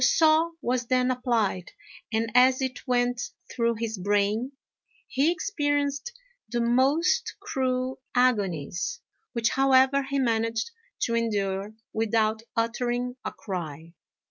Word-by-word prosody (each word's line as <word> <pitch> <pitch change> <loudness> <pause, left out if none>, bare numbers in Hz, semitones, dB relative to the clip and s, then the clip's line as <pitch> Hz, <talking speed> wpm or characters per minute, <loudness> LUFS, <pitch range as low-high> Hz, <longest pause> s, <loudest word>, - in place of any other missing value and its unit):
The - - +6
saw 320 +1 +4
was 245 -1 0
then 255 0 +2
applied, 230 -8 -1 0.4
and 225 0 0
as 255 +1 +6
it 260 0 -4
went 245 0 +1 0.3
through 235 -1 +1
his 225 -2 -3
brain 205 +6 +1 0.5
he 280 +6 +2
experienced 290 - -1 0.4
the 240 +1 -1
most 280 - +2
cruel 260 -9 -2
agonies, 205 - +1 0.3
which, 235 -2 +1
however, 270 +1 +4
he 275 +1 -3
managed 230 - 0 0.3
to 230 - +1
endure 205 -2 -1 0.2
without 220 0 +1 0.2
uttering 240 +2 -1
a - - -3
cry. 165 -4 -6
245 Hz, 115 wpm, -27 LUFS, 220-265 Hz, 0.5 s, The